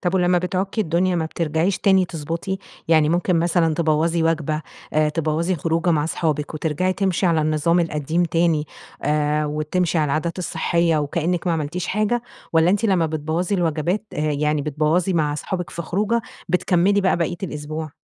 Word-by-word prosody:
طب 175 0 -1
ولمّا 180 -1 +3
بتعكّي 190 +4 -2
الدنيا 175 0 +1
ما 160 - 0
بترجعيش 165 +3 -1
تاني 190 -2 +4
تضبَّطي؟ 170 +4 -4 0.3
يعني 155 -2 +4
ممكن 175 +1 +1
مثلًا 165 -1 +2
تبوَّظي 165 +1 +1
وجبة 155 -1 0 0.3
آآ، 155 0 +3
تبوَّظي 165 +3 0
خروجة 165 +3 0
مع 150 -3 +2
أصحابِك، 155 -2 -2
وترجعي 160 +4 0
تمشي 190 -1 0
على 165 -2 +3
النظام 155 +3 +2
القديم 160 +1 0
تاني، 165 -2 +1 0.4
آآ، 150 +1 +1
وتمشي 155 +3 0
على 155 - +2
العادات 155 +5 -1
الصحية 170 -2 +1
وكأنِّك 170 +5 -1
ما 175 - +2
عملتيش 160 +2 -2
حاجة، 215 +4 0 0.3
والّا 165 +1 +4
أنتِ 205 +3 +1
لمّا 185 -6 +3
بتبوَّظي 160 +5 -2
الوجبات، 175 +3 0
آآ - - -6
يعني 150 0 0
بتبوَّظي 155 +5 +1
مع 155 -3 +1
أصحابك 180 +4 -4
في 170 - -5
خروجة 210 +7 0 0.3
بتكمِّلي 185 +2 +2
بقى 190 -1 +2
باقية 170 +1 -1
الأسبوع؟ 155 -2 -5
165 Hz, 165 wpm, -22 LUFS, 155-180 Hz, 0.4 s, تاني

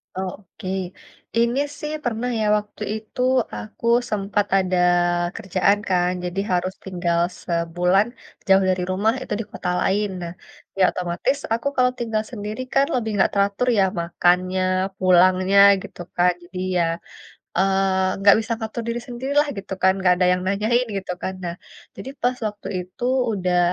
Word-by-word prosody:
Oh, 190 0 -2
oke. 185 - -11 0.7
Ini 235 +3 +2 0.2
sih 300 0 -4
pernah 240 0 -2
ya, 215 - +1
waktu 210 0 -8 0.2
itu 220 +3 -7 0.3
aku 215 +2 -8 0.2
sempat 205 0 0
ada 185 -1 +1 0.6
kerjaan 200 -1 +1
kan, 180 -1 +2
jadi 180 +2 -3
harus 185 +1 0
tinggal 175 -2 -1 0.2
sebulan 175 +4 +1 0.4
jauh 190 0 +6
dari 185 -1 0
rumah, 210 +4 +2
itu - - -4
di 225 - -3
kota - - -4
lain. 205 +3 +1
Nah, 170 0 -5 0.4
ya 190 - +4
otomatis 180 +10 -1 0.2
aku 230 +4 -1
kalau 250 -1 +3
tinggal 220 -2 -1
sendiri 215 +2 -5
kan 275 +1 +4
lebih 225 -3 -1
enggak 195 - +3
teratur 200 +5 +1
ya, 195 - +5 0.2
makannya, 180 +2 +1 0.4
pulangnya, 185 +1 +4 0.2
gitu - - -10
kan. 180 0 +4
Jadi, 180 +1 -8 0.2
ya, 175 - +3 0.7
eee, 190 -1 +2
enggak 200 0 +7
bisa 230 - -7
ngatur 220 +1 -4
diri 235 +1 -1
sendiri 255 +3 -5
lah, 295 - +2
gitu 195 0 -6
kan, 190 0 +5
enggak 185 -1 +4
ada 180 - +4
yang 180 0 +1
nanyain, 215 +6 +1
gitu 190 -1 -4
kan. 190 - -2
Nah, 170 0 -3 0.4
jadi 265 - -7
pas 250 +1 +1
waktu 205 0 -8 0.2
itu, 185 +6 -12 0.3
udah 180 -3 +1
195 Hz, 160 wpm, -22 LUFS, 180-220 Hz, 0.7 s, enggak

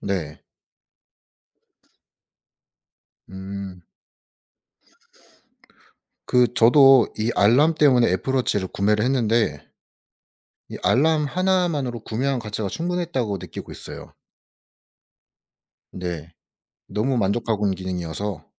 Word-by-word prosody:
네. 95 -6 -4 2.9
음. 95 -1 -8 2.4
그 125 -1 +2
저도 135 +1 +6
이 110 +2 0
알람 130 +11 +4
때문에 130 -6 +4
애플 95 +9 -2
워치를 105 -7 0
구매를 105 +2 +1
했는데 115 - 0 1.0
이 - - -7
알람 155 +3 +2
1 185 +3 +1
만으로 130 -7 -3
구매한 130 +5 -2
가치가 105 -2 -4
충분했다고 165 - -2
느끼고 90 -3 -9
있어요. - - -9 1.8
네. 85 -2 -6 0.6
너무 125 +5 -1
만족하고 105 0 0
있는 95 - 0
기능이어서 95 +2 -5
115 Hz, 190 characters per minute, -22 LUFS, 95-135 Hz, 2.9 s, 저도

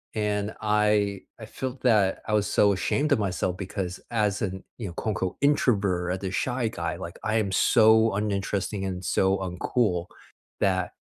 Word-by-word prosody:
And 105 0 -1
I 105 -2 +2 0.2
I 110 - -8
felt 130 +4 -6
that 105 -6 +3
I 105 - -1
was 105 -1 +2
so 100 -1 +4
ashamed 145 - 0
of 140 - +4
myself 95 -2 -1
because 95 -1 -4
as 105 -3 0
an, 95 -2 -3 0.2
you 110 - -4
know, 85 - -7
quote, 110 - -3
unquote 95 -1 -2
"introvert," 100 -11 +2
as 95 - -9
a - - -7
shy 120 +3 -1
guy, - - -3
like, - - -8
I 105 - 0
am 105 -3 +1
so 110 +2 +5
uninteresting 100 -1 -2
and 95 -1 -4
so 95 0 +2
uncool 90 0 -1 0.5
that, 95 -2 +1
100 Hz, 175 wpm, -26 LUFS, 95-110 Hz, 0.5 s, so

